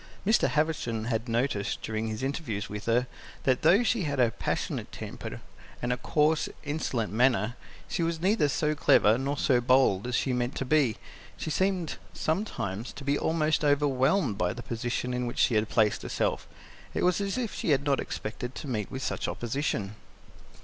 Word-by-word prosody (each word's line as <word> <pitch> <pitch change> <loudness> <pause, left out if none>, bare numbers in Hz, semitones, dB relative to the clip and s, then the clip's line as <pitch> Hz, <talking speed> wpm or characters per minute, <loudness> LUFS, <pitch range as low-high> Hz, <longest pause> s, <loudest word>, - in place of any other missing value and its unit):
Mr. 220 +3 +4
Havisham 150 -8 0
had 115 0 -2
noticed, 115 -4 -1
during 110 0 -2
his 110 +3 -4
interviews 125 -7 -2
with 105 0 -6
her, 120 +2 +3 0.4
that 130 -2 +2
though 200 +7 +5
she 235 -2 +1
had 145 -2 -2
a 120 -2 +4
passionate - - -3
temper, - - -7 0.4
and 120 +1 0
a - - -3
coarse, 150 +4 +2
insolent 140 -8 -2
manner, 120 -1 +2 0.3
she - - -2
was 165 0 0
neither 185 -4 +2
so 150 +1 +1
clever 110 -7 +5
nor 140 +2 -1
so 125 -3 +3
bold 125 -5 +3
as 125 - -1
she 130 - +1
meant 125 +1 -1
to 135 - -2
be; 135 -5 +3 0.4
she 155 - -4
seemed 185 -1 0 0.2
sometimes 120 - -2
to 140 - -9
be 140 +1 +1
almost 155 0 +1
overwhelmed 145 - +2
by 90 0 +1
the 120 - -8
position 120 +1 -2
in 125 0 -1
which 120 - -5
she - - +3
had 110 0 +2
placed 110 -3 +2
herself. - - -1 0.5
It - - 0
was 180 +2 +3
as 200 +3 -1
if 240 -4 -2
she - - -3
had 140 -2 +3
not 140 -2 +2
expected 120 +4 -5
to - - -6
meet 110 -6 -2
with 130 0 -5
such - - -2
opposition. 120 -5 -2
130 Hz, 185 wpm, -28 LUFS, 115-150 Hz, 0.5 s, though